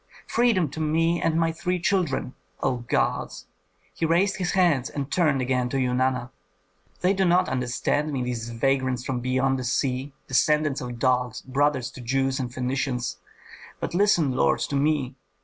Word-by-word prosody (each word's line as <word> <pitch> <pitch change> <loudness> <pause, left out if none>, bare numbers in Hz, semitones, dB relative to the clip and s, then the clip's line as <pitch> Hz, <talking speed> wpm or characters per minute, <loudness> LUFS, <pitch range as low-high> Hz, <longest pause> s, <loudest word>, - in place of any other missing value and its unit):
Freedom 230 -8 +2
to 160 - -7
me 165 +2 +1
and 165 0 +1
my 165 0 +2
three 180 +3 -2
children! 170 -9 0 0.3
O 130 -2 +1
gods!" 120 0 -1 0.5
He - - -6
raised 175 +5 +2
his 180 -2 -1
hands 170 -9 +2
and 140 -1 -5
turned 150 -7 +2
again 125 -1 0
to 135 - -1
Eunana, 125 -1 0 0.7
"They 185 +2 +3
do 195 -1 +1
not 180 0 +3
understand 130 +4 -1
me, 130 -3 -2
these 120 -2 -3
vagrants 130 +1 0
from 130 -3 -2
beyond 130 +1 +1
the - - -4
sea, 130 +2 -1 0.2
descendants 150 +1 +2
of 125 -1 -6
dogs, 125 -2 0
brothers 130 -1 0
to 130 - -10
Jews 135 +2 0
and 125 -2 -2
Phœnicians! 125 -5 -2 0.6
But - - -4
listen, 175 -6 +3
lord, 130 - +2
to 140 - -2
me! 140 -2 +1
135 Hz, 165 wpm, -25 LUFS, 125-160 Hz, 0.7 s, They